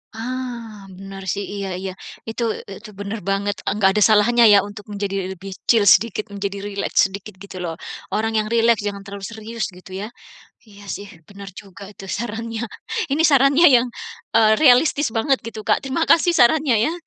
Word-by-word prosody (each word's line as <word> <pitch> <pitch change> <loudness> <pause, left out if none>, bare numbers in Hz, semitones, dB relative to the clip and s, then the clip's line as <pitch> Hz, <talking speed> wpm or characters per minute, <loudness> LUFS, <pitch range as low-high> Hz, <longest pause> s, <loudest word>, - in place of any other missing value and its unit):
Ah, 235 -3 -6
benar 195 0 -9
sih, 200 - -4
iya 200 -1 -4
iya, 190 - -4 0.4
itu 225 +2 -3 0.3
e - - -7
itu 235 - -12
bener 205 +2 -4
banget. 200 +1 0
Enggak 200 -1 +2
ada - - +2
salahnya 235 +3 +4
ya 205 - +8
untuk 205 0 -11
menjadi 200 -1 -3 0.2
lebih 195 +2 -10
chill 215 -4 +4
sedikit, 220 -1 +3
menjadi 200 0 -4
rileks 200 -1 +1
sedikit 200 +1 -9
gitu 195 -2 -10
loh. 165 -2 -3 0.4
Orang 225 +1 0
yang 215 - +1
rileks, 230 -1 +3
jangan 200 -1 -4
terlalu 200 -1 -8
serius 225 +1 -5
gitu 180 +1 -15
ya. - - -4 0.6
Iya 205 -2 -16
sih, 200 - -8 0.2
bener 200 -1 -10
juga 200 0 -14
itu 195 - -11
sarannya. 225 0 -5 0.5
Ini 305 +3 +2
sarannya 280 +3 +5
yang, 245 +1 +3 0.5
eee, 220 -1 +5
realistis 285 +2 +5
banget 265 +4 +2
gitu, 220 -1 -7
Kak. - - +4
Terima 270 +5 0
kasih 340 +1 +4
sarannya 280 -1 +4
ya. - - -3
215 Hz, 175 wpm, -21 LUFS, 200-235 Hz, 0.6 s, ya